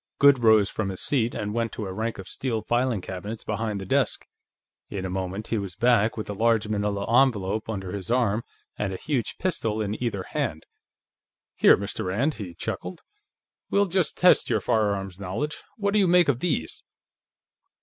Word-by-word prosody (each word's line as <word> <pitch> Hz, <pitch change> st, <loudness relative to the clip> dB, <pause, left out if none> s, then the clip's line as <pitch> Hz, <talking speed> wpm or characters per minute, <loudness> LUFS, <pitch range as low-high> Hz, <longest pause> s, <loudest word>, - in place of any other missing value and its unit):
Goode 140 Hz, -3 st, +6 dB
rose 110 Hz, -3 st, +6 dB
from 110 Hz, -3 st, -2 dB
his 95 Hz, -, -5 dB
seat 120 Hz, -5 st, +1 dB
and 105 Hz, 0 st, -3 dB
went 115 Hz, 0 st, -1 dB
to 105 Hz, -, -4 dB
a 95 Hz, -, -5 dB
rank 110 Hz, +3 st, -3 dB
of 95 Hz, -, -8 dB
steel 115 Hz, -5 st, -2 dB
filing 120 Hz, -2 st, +1 dB
cabinets 100 Hz, +5 st, -6 dB
behind 105 Hz, -1 st, -2 dB
the 95 Hz, -, -6 dB
desk. -, -, +1 dB, 0.6 s
In 95 Hz, -2 st, -4 dB
a 95 Hz, -, -3 dB
moment, 95 Hz, +3 st, -4 dB
he 115 Hz, -, 0 dB
was 95 Hz, -4 st, -6 dB
back, 115 Hz, -1 st, +3 dB
with 110 Hz, -, -4 dB
a 105 Hz, -, -3 dB
large 110 Hz, +1 st, +2 dB
manila 105 Hz, -1 st, -1 dB, 0.2 s
envelope 110 Hz, -4 st, -2 dB
under 95 Hz, -4 st, -4 dB
his 100 Hz, -1 st, -4 dB
arm, 115 Hz, -3 st, +1 dB, 0.4 s
and 100 Hz, -2 st, -1 dB
a -, -, -4 dB
huge 140 Hz, -3 st, -2 dB
pistol 115 Hz, -13 st, -1 dB
in 105 Hz, +1 st, -3 dB
either 100 Hz, -6 st, -2 dB
hand. -, -, -3 dB, 0.9 s
"Here, -, -, +6 dB
Mr. 100 Hz, -1 st, -4 dB
Rand," 120 Hz, +12 st, 0 dB
he 95 Hz, -8 st, -8 dB
chuckled. 110 Hz, -, -5 dB, 0.7 s
"We'll 200 Hz, 0 st, +3 dB
just 185 Hz, -2 st, 0 dB
test 180 Hz, -, +5 dB
your 110 Hz, -3 st, +2 dB
firearms 100 Hz, -4 st, 0 dB
knowledge. 100 Hz, +11 st, -3 dB, 0.2 s
What 200 Hz, -2 st, 0 dB
do 210 Hz, -, +4 dB
you 195 Hz, -, +4 dB
make 175 Hz, -2 st, +5 dB
of 125 Hz, -4 st, +2 dB
these?" 140 Hz, -, -2 dB
110 Hz, 185 wpm, -26 LUFS, 100-125 Hz, 0.9 s, Goode